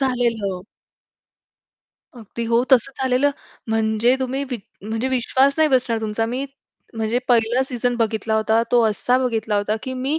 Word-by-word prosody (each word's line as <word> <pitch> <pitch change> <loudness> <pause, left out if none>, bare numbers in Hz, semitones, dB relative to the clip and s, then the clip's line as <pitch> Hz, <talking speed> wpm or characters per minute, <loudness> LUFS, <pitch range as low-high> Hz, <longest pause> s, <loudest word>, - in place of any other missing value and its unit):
झालेलं. 230 -8 -1 1.5
अगदी 235 0 -7
हो, 235 +1 +3
तसं 260 +1 +4
झालेलं. 260 +2 +2 0.4
म्हणजे 220 +2 +2
तुम्ही 260 +1 -2
वि 245 - -3 0.2
म्हणजे 225 +4 -2
विश्वास 260 +2 +2
नाही 315 -1 +5
बसणार 250 -4 +1
तुमचा. 220 +1 -2
मी 255 +4 -3 0.5
म्हणजे 225 +2 0
पहिला 235 +2 +3
सीजन 245 -2 -2
बघितला 220 -1 -1
होता, 220 +1 +2
तो 240 -1 +5
असा 245 +4 +1
बघितला 225 -4 -1
होता, 205 +2 0
की 260 - -5
मी 270 +5 -1
235 Hz, 145 wpm, -21 LUFS, 220-255 Hz, 1.5 s, नाही